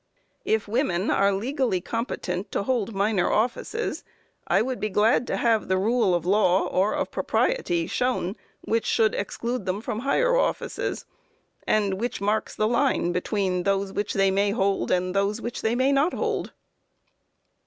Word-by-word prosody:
If 220 -1 0
women 205 -5 0
are 200 +1 +3
legally 235 0 0
competent 195 -3 -4
to - - 0
hold 230 -3 -1
minor 200 -2 +1
offices, 250 - -1 0.4
I - - +3
would 255 +1 -3
be 215 - -1
glad 215 +4 +2
to - - -1
have 225 -2 +1
the 190 - +1
rule 215 -1 +2
of 175 -1 -2
law, 190 -1 +3
or 190 +3 +1
of - - -2
propriety, 175 - 0
shown 245 -5 -1 0.3
which 230 0 -1
should 220 -1 +3
exclude 235 +1 -3
them 185 +2 -1
from 220 0 -4
higher - - +2
offices, - - -1 0.6
and 200 -2 +1
which 240 - -2
marks 210 +2 -1
the 215 - +1
line 240 -7 +1
between 180 0 -1
those 195 +1 0
which 205 0 -2
they 195 -1 +3
may 200 +1 +1
and 190 -3 0
those 200 +3 +1
which 235 +1 -5
they 225 +2 +1
may 260 +2 +2
not 280 +5 +2
hold. - - -2
210 Hz, 160 wpm, -25 LUFS, 195-240 Hz, 0.6 s, are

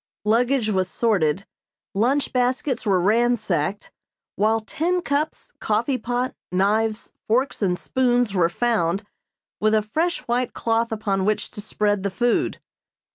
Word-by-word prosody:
Luggage 235 +2 +2
was 190 -3 +1
sorted, 195 -6 +1 0.5
lunch 250 +8 +1
baskets 250 -1 0
were 190 -2 +3
ransacked, 205 -4 +1 0.4
while 220 +2 +2
tin 345 +10 -1
cups, 290 +2 -2
coffee 235 +5 0
pot, 245 +3 -2 0.2
knives, 215 +4 +1 0.2
forks 250 +4 +1
and 180 -3 +1
spoons 245 -3 +1
were 175 -3 +3
found, 200 -3 0 0.6
with 215 +1 +3
a 215 - +2
fresh 325 +11 -1
white 245 +1 -1
cloth 230 0 0
upon 200 -3 -1
which 210 +2 0
to 205 - -6
spread 205 -1 0
the 200 - -1
food. 240 +5 0
220 Hz, 130 wpm, -23 LUFS, 200-245 Hz, 0.6 s, were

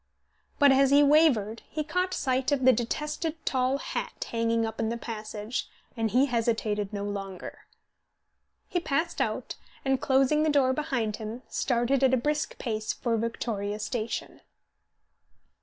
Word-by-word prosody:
But 285 -2 +6
as 270 0 +5
he 285 +1 +6
wavered 275 -8 +4
he 305 - -2
caught 365 +4 -1
sight 260 +1 0
of 270 -3 +1
the 260 - +8
detested 300 +7 -2
tall 260 +1 +1
hat - - -4
hanging 230 0 +1
up 220 0 -6
in 225 -1 0
the 235 - -2
passage, 215 0 -5 0.3
and 225 -2 0
he 255 +5 +4
hesitated 220 -5 0
no 200 -1 -4
longer. 195 -2 -6 1.0
He 355 - 0
passed 335 +2 -1
out, - - -2 0.3
and, 270 -1 +1
closing 270 +3 +3
the 310 - +2
door 275 -3 +3
behind 250 -8 -1
him, 225 +3 -6
started 250 +2 +1
at 260 -1 +5
a - - +1
brisk 295 +5 -1
pace 215 -3 -2
for 235 -2 -1
Victoria 215 -2 -2
station. 225 +1 -4
245 Hz, 150 wpm, -28 LUFS, 220-280 Hz, 1.0 s, the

